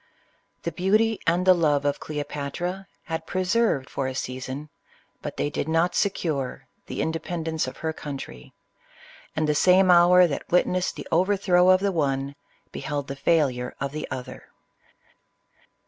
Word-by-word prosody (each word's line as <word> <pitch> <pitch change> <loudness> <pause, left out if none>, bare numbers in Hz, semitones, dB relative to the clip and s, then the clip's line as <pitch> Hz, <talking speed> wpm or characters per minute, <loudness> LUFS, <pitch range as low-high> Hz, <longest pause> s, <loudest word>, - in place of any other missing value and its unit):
The 170 - -2
beauty 215 +6 +2
and 175 +2 +2
the 185 - +8
love 150 -5 +1
of 145 - 0
Cleopatra 150 +6 -4 0.2
had 160 -2 -5
preserved 185 - +1
for 135 -1 -3
a 130 - -4
season, 130 +4 -5 0.5
but - - -6
they 145 - -1
did 145 - -3
not 165 +2 +2
secure, 155 -10 -1 0.2
the - - -2
independence 160 0 -2
of - - -7
her 160 0 -3
country; 135 - -8 0.8
and 155 -1 0
the 150 - +2
same 185 +4 +5
hour 180 +1 +7
that 145 -5 -4
witnessed 180 +1 +2
the - - -8
overthrow 185 0 +3
of 185 0 +5
the 200 0 +1
one, 140 -4 -1 0.4
beheld 145 -2 -4
the 140 - -4
failure 135 -4 +1
of 140 0 -3
the 155 +1 -5
other. 130 -2 -7
160 Hz, 145 wpm, -25 LUFS, 140-180 Hz, 0.8 s, the